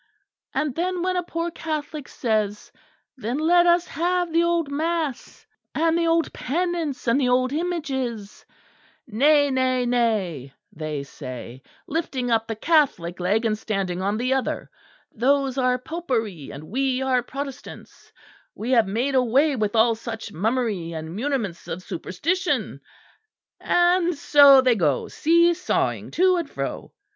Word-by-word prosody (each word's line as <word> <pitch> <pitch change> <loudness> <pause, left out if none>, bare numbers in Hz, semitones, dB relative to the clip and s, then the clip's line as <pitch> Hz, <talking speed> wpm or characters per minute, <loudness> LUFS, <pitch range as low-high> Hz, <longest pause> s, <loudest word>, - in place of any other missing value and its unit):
And 300 -3 0
then 355 +3 -2
when 370 0 0
a 360 - +1
poor 335 0 -4
Catholic 305 -3 -5
says, 215 -3 -2 0.5
Then 240 +2 -3
let 345 +3 +4
us 345 0 +4
have 350 +1 -1
the 335 - +4
old 340 -3 0
mass, 315 -2 -3 0.3
and 325 +1 +2
the 335 0 +1
old 330 0 +1
penance 330 -3 -2
and 235 +5 +3
the 250 - +2
old 255 +1 +2
images: 270 - -3 0.6
Nay, 285 +5 +3
nay, 255 -1 +1
nay, 200 - -1 0.2
they 150 -2 -4
say, 130 -2 -9 0.2
lifting 270 -6 -2
up 225 -1 +1
the 225 - -3
Catholic 225 - +1
leg 205 +6 +1
and 215 -1 +1
standing 195 -4 -3
on 200 +2 0
the 255 +3 0
other, 265 -1 -2 0.4
those 270 +2 +1
are 250 -1 +2
Popery; 250 - -3
and 140 +2 -9
we 260 +7 -1
are 255 -1 +2
Protestants; 275 +2 -9 0.4
we 235 +4 -4
have 230 -5 +4
made 240 +8 -1
away 265 +4 +3
with 215 -2 -1
all 230 +1 +5
such 225 -1 -7
mummery 210 -3 -1
and 160 +1 -6
muniments 230 -7 -3
of 185 - -5
superstition. 290 - -2 0.8
And 350 0 +2
so 280 -2 +7
they 255 -1 +4
go 155 - 0
see 340 +2 +3
sawing 365 +2 -1
to 370 +1 +4
and 335 -4 -3
fro. - - -5
260 Hz, 145 wpm, -23 LUFS, 215-320 Hz, 0.8 s, so